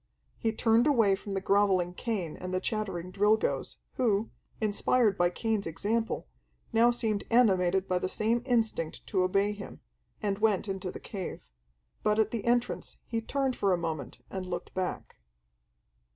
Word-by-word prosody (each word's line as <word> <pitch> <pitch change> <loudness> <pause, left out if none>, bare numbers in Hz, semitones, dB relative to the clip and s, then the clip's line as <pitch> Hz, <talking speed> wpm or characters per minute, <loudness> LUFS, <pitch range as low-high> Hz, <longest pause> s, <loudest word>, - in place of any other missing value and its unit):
He 225 - +1
turned 225 +3 +3
away 225 -9 +4
from 200 +1 -7
the 195 - -1
groveling 195 -3 +2
Cain 190 -6 -3
and 180 0 -6
the 185 - +1
chattering 190 -4 -3
Drilgoes, 210 +3 +1 0.2
who, 220 -3 +1 0.3
inspired 215 0 +2
by 175 0 +3
Cain's 220 +1 -1
example, 210 - -1 0.5
now 230 +2 +6
seemed 225 -4 0
animated 190 -5 +3
by 180 -1 +1
the 185 - -2
same 225 +4 +1
instinct 225 - 0
to 190 - 0
obey 195 +3 +2
him, 205 -1 -8 0.4
and 200 -1 -1
went 215 -2 +2
into 190 -2 -3
the - - -8
cave. 195 -4 -6 0.6
But 210 0 +2
at 220 -1 +2
the 230 -3 -3
entrance 240 0 0
he 230 -1 -2
turned 265 +2 -1
for 195 -2 +2
a - - +2
moment 165 -2 -4
and 190 -1 -3
looked 180 -1 -5
back. 185 -1 -4
205 Hz, 160 wpm, -30 LUFS, 185-225 Hz, 0.6 s, now